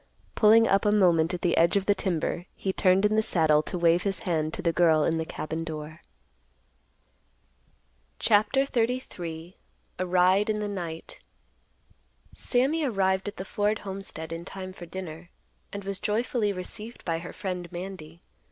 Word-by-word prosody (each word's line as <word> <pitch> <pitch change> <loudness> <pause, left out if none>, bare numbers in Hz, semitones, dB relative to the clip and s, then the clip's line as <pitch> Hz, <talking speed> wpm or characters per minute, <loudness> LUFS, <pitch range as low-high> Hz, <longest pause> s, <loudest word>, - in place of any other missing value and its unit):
Pulling 225 +1 +6
up 195 0 +3
a 210 - +3
moment 175 -6 +4
at 180 -1 -5
the 175 - +2
edge 170 +4 +4
of 195 - -1
the 205 - +4
timber, 175 -2 -2
he 190 - -2
turned 190 +2 +3
in 210 +1 +2
the 220 - +4
saddle 160 -7 +3
to 180 - -5
wave 170 0 +3
his 195 -1 -1
hand 155 -4 0
to - - -6
the 170 - +2
girl 160 -2 +4
in 165 +1 +1
the 160 - -2
cabin 160 +1 -4
door. 155 0 -7 2.2
CHAPTER 220 +6 +3
XXXIII. 190 -10 -3 0.4
A 185 - 0
RIDE 185 +4 +3
IN 215 0 0
THE 210 - -2
NIGHT. 170 -5 -6 1.1
Sammy 275 +6 +1
arrived 195 -6 +1
at 205 - -6
the 190 - -5
Ford 210 +2 0
homestead 190 -4 -6
in 165 +1 -6
time 185 +1 -7
for 175 -2 -10
dinner, 170 -1 -7 0.4
and 200 0 -6
was 195 -1 -4
joyfully 220 0 0
received 210 +5 -7
by 165 -1 -1
her 175 - -8
friend, 180 -3 -5
Mandy. 175 -2 -8
185 Hz, 165 wpm, -27 LUFS, 165-205 Hz, 2.2 s, Pulling